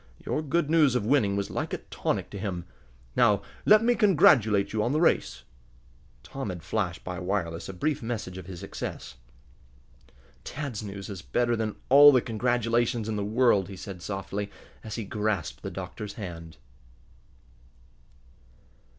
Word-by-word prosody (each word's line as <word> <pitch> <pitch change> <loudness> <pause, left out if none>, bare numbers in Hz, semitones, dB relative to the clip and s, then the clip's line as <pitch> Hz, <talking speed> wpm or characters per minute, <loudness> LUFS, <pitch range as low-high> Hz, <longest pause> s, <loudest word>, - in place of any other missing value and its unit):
Your 150 - -1
good 155 +1 0
news 155 -5 +4
of 120 -4 0
winning 110 -6 +3
was 100 0 -2
like - - -3
a - - 0
tonic - - -3
to 100 - -6
him. 90 -4 -4 0.5
Now 100 -1 +4 0.2
let 215 +1 +7
me 240 +1 +4
congratulate 145 - +4
you 110 - +1
on 120 +5 0
the 155 - +2
race." 170 - +1 0.8
Tom 135 -6 -5
had 90 -3 -6
flashed 95 -6 -2
by 90 0 -5
wireless 90 -3 -2
a - - -5
brief 145 +10 -1
message 110 -6 -4
of 90 - -11
his 90 -3 -8
success. - - -6 1.3
"Dad's 140 -7 -5
news 100 -2 -7
is 100 -5 -7
better 120 - 0
than 110 -2 -2
all 145 +2 +9
the 130 - +5
congratulations 120 0 0
in 110 - -2
the 105 - -1
world," 105 -3 +2
he 95 - -8
said 95 -2 -8
softly, 100 +2 -4 0.3
as 110 -1 -6
he 115 - -3
grasped 100 - -2
the - - -5
doctor's 105 -1 -7
hand. 85 -6 -8
105 Hz, 160 wpm, -27 LUFS, 95-125 Hz, 1.3 s, all